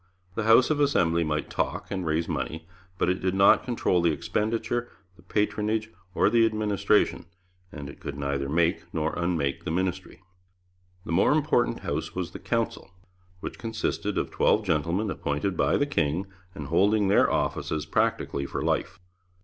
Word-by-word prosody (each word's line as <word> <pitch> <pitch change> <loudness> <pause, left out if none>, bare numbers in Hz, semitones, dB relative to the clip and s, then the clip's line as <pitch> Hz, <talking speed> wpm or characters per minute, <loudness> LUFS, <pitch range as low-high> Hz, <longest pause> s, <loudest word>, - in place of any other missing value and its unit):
The 110 +2 -2
House 115 +6 +6
of 150 - +1
Assembly 85 - +2
might 75 -1 -2
talk, - - -2
and 95 -2 -2
raise 80 +1 0
money, 80 +1 -4 0.3
but - - +1
it 90 +1 0
did 95 0 0
not 95 0 +6
control 115 -7 +1
the 85 - +3
expenditure, 115 +8 -1 0.3
the 90 - -19
patronage, 105 +3 -1 0.2
or - - +4
the 115 -1 +4
administration, 105 -4 +1 0.4
and 75 -2 -7
it 70 - -11
could 70 - -6
neither 70 -1 -2
make 85 +3 0
nor 80 -2 -1
unmake 85 -6 -1
the - - -4
ministry. 95 +2 -3 0.8
The - - -5
more 85 +4 +4
important 150 -5 +1
House - - -3
was - - -3
the - - -8
Council, - - -2 0.5
which - - -6
consisted 115 -1 -2
of - - -1
twelve 105 - +2
gentlemen 85 +5 0
appointed 75 +6 -2
by 70 0 +2
the 145 - +2
king, 85 - 0 0.3
and 75 -5 -7
holding 100 +5 +3
their 100 - +4
offices 75 0 -1
practically 70 -2 0
for - - -4
life. - - -1
90 Hz, 165 wpm, -26 LUFS, 80-110 Hz, 0.8 s, House